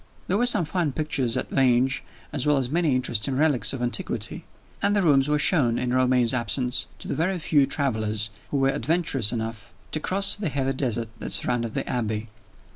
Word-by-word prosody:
There 190 - +1
were 245 - +4
some 180 -8 +4
fine 160 -3 -1
pictures 140 -6 -1
at - - -3
Vange, 130 0 +2 0.3
as - - 0
well 150 -1 +4
as 130 -1 -1
many 160 -4 +2
interesting 125 +1 -1
relics 145 -4 +2
of 130 -3 -4
antiquity; 120 - -2 0.4
and 205 +1 +2
the 205 - +2
rooms 140 -3 +3
were 150 - +2
shown, 140 -6 +3
in 125 0 -1
Romayne's 125 -2 +3
absence, 125 +1 0
to - - -8
the - - -2
very 175 +6 0
few 145 -4 +2
travelers 110 -6 -1 0.2
who 145 - -1
were 135 0 +2
adventurous 140 - +1
enough 110 -3 -5 0.2
to 155 - -1
cross 195 +5 +2
the 205 -5 -2
heathy 135 -1 -1
desert 120 -4 -1
that - - -3
surrounded 120 -2 0
the - - -2
Abbey. 110 -2 -2
135 Hz, 195 wpm, -25 LUFS, 120-155 Hz, 0.4 s, were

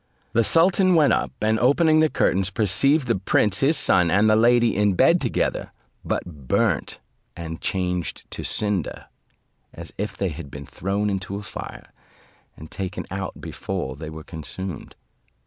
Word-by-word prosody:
The 115 0 +3
sultan 180 - +3
went 150 -3 +4
up, - - 0
and 110 +1 +2
opening 155 +4 +4
the 155 0 +4
curtains, 95 -7 +1
perceived 130 - +2
the 115 -3 +1
prince 100 +1 +2
his 150 +4 +3
son 85 -2 +3
and 100 +5 +3
the 110 - +5
lady 120 0 +4
in 100 -1 +2
bed - - +4
together, - - -1 0.3
but 75 -7 -5
burnt - - 0 0.4
and 80 -1 -7
changed 90 -2 -2
to - - -6
cinder, 105 -6 0 0.7
as - - -11
if 105 +1 -4
they 95 - -1
had 80 -2 -8
been 70 +1 -9
thrown 100 +7 -2
into 95 0 -4
a 100 - -6
fire, - - -9 0.6
and 80 - -12
taken 95 -2 -5
out 95 -1 -5
before 65 - -5
they 75 +2 -8
were 80 0 -9
consumed. 85 +3 -7
100 Hz, 160 wpm, -23 LUFS, 90-115 Hz, 0.7 s, the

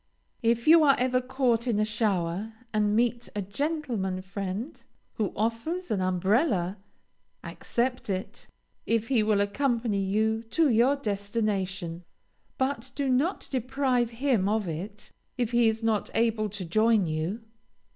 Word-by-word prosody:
If 235 +1 +1
you 325 0 +8
are 275 -2 +6
ever 255 0 +1
caught 255 -2 0
in 220 -4 +1
a 215 - +3
shower, 210 -2 -1 0.2
and 210 -1 +2
meet 240 +1 0
a 205 - -1
gentleman 215 - -2
friend 195 +6 -5 0.4
who 210 -4 0
offers 230 - -2
an 200 -3 +1
umbrella, 190 - +1 0.7
accept 250 -1 -2
it, 190 -1 -4 0.4
if 230 0 0
he 250 -5 +3
will 210 -1 +2
accompany 230 -1 0
you 220 +3 +1
to 310 +6 +3
your 240 +5 +4
destination; 200 -6 -2 0.5
but 260 -1 -2
do 275 -1 -1
not 275 +9 +1
deprive 255 -1 0
him 230 -5 +1
of 215 -2 0
it, 195 +6 -6 0.3
if 240 -2 -1
he 240 -1 +4
is 220 +1 0
not 220 -2 0
able 225 -2 +1
to 200 -2 -6
join 215 +3 +3
you. 160 +7 -2
225 Hz, 140 wpm, -27 LUFS, 200-250 Hz, 0.7 s, you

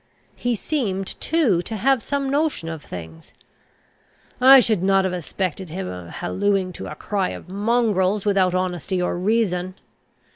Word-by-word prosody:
He 245 -1 -1
seemed, 205 -7 -2 0.2
too, 275 - +2
to 220 - -6
have 265 +3 +2
some 280 +1 -2
notion 285 - 0
of 160 -2 -6
things: 80 -2 -10 1.1
I 265 +1 +9
should 220 -7 +2
not 195 0 +3
have 185 - -1
suspected 180 +1 -3
him 185 +4 -5
of 90 -1 -7
hallooing 185 - -1
to - - -6
a 150 - -7
cry 195 +3 -2
of - - -8
mongrels 205 -1 +1
without 190 -3 +2
honesty 185 0 -1
or 180 - 0
reason. 185 -2 0
190 Hz, 150 wpm, -22 LUFS, 180-230 Hz, 1.1 s, I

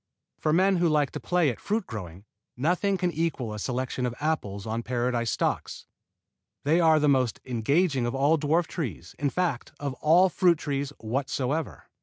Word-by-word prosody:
For 155 - +1
men 190 +3 +4
who 170 -1 +3
like 150 -2 +2
to - - -5
play 175 -6 +2
at 115 - -9
fruit 210 -1 -1
growing, 95 -4 -8 0.3
nothing 180 +8 +1
can 180 -1 0
equal 150 -9 -2
a 105 - -6
selection 125 +2 -2
of 120 - -5
apple 150 -10 -1
trees 100 - -9
on 115 +1 -2
Paradise 120 -1 -1
stocks. - - -2 0.8
They 155 +4 +3
are 160 -2 +5
the 150 - +2
most 130 -5 +2
engaging 130 +3 +1
of 120 - -3
all 145 +4 +3
dwarf 160 +4 +2
trees, 125 - -5
in 145 0 +1
fact 170 -7 -2
of 140 -2 -3
all 170 +5 +6
fruit 180 -2 +3
trees 140 -2 -2
whatsoever. 135 +5 -2
145 Hz, 180 wpm, -27 LUFS, 120-165 Hz, 0.8 s, all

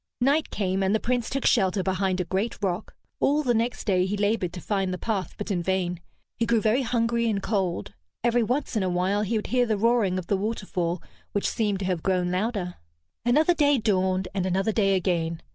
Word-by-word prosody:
Night 280 +5 +2
came, 190 -1 -1
and 190 +2 +2
the - - +2
Prince 245 0 -1
took 275 0 -2
shelter 190 -3 +3
behind 190 0 0
a - - +1
great 195 +6 -1
rock. 190 +1 -2 0.2
All 295 +2 +2
the 245 -3 +2
next 235 +2 -1
day 185 -3 +2
he 205 +2 -2
labored 205 -3 0
to 180 - -6
find 195 0 -1
the 180 - -2
path, 200 -2 -3
but 210 - -4
in 180 -3 0
vain. 180 -1 -1 0.4
He 230 - 0
grew 230 -1 +3
very 220 +5 +2
hungry 235 -1 +1
and 205 -2 0
cold. 190 - -2 0.3
Every 240 0 +3
once 250 +3 -1
in 215 - +2
a 185 - 0
while 185 +3 +1
he 215 +2 0
would 210 - -3
hear 250 -1 +3
the 215 -2 +1
roaring 220 -4 +2
of 185 - -4
the 200 - +1
waterfall, 190 -5 -2 0.3
which 205 - 0
seemed 210 -3 0
to - - -2
have 180 -3 -1
grown 180 -1 +1
louder. 185 -1 -2 0.5
Another 300 +9 +4
day 290 -3 +3
dawned, 190 -4 +1
and 190 -2 -1
another 195 +4 +1
day 195 -3 +2
again. 170 -3 0
200 Hz, 215 wpm, -26 LUFS, 185-230 Hz, 0.5 s, Another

